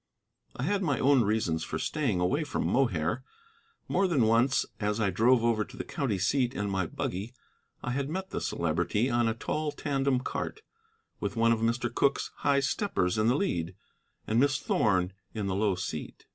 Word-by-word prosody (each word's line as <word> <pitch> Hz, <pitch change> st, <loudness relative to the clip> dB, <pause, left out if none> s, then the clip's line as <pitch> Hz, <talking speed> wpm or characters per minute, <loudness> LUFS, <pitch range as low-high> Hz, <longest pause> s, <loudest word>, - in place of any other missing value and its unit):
I 125 Hz, -, -4 dB
had 200 Hz, +6 st, +1 dB
my 145 Hz, -8 st, +1 dB
own 135 Hz, -1 st, +4 dB
reasons 100 Hz, -7 st, 0 dB
for -, -, -3 dB
staying 130 Hz, -12 st, -1 dB
away 130 Hz, -, +1 dB
from 150 Hz, -, -2 dB
Mohair. 115 Hz, -, +1 dB, 0.6 s
More 195 Hz, -, +2 dB
than 150 Hz, -9 st, +2 dB
once 115 Hz, +4 st, +3 dB
as 105 Hz, 0 st, -1 dB
I 100 Hz, -3 st, +2 dB
drove 115 Hz, +6 st, +4 dB
over 115 Hz, -2 st, +2 dB
to -, -, -13 dB
the -, -, -3 dB
county 135 Hz, -, -2 dB
seat 125 Hz, +5 st, +1 dB
in 100 Hz, -1 st, -2 dB
my 95 Hz, -3 st, 0 dB
buggy 100 Hz, +9 st, -4 dB, 0.5 s
I 125 Hz, -, -2 dB
had 135 Hz, +2 st, -1 dB
met 190 Hz, +4 st, -4 dB
the -, -, -3 dB
Celebrity 85 Hz, +9 st, 0 dB
on 120 Hz, -1 st, +2 dB
a 110 Hz, -, 0 dB
tall 155 Hz, +5 st, -2 dB
tandem 135 Hz, -3 st, 0 dB
cart, 435 Hz, -, -4 dB, 0.6 s
with -, -, -3 dB
one 115 Hz, 0 st, +3 dB
of 115 Hz, -, +2 dB
Mr. 120 Hz, +1 st, 0 dB
Cooke's 140 Hz, +2 st, +1 dB
high 140 Hz, -1 st, +2 dB
steppers 120 Hz, -, 0 dB
in 110 Hz, -, +3 dB
the 125 Hz, -, +4 dB
lead, 90 Hz, -, -1 dB, 0.5 s
and 110 Hz, +2 st, +1 dB
Miss 135 Hz, 0 st, +3 dB
Thorn 95 Hz, -8 st, +1 dB, 0.2 s
in 105 Hz, -2 st, -2 dB
the 95 Hz, -, -1 dB
low 100 Hz, 0 st, +1 dB
seat. 90 Hz, -4 st, -6 dB
115 Hz, 185 wpm, -29 LUFS, 100-135 Hz, 0.6 s, own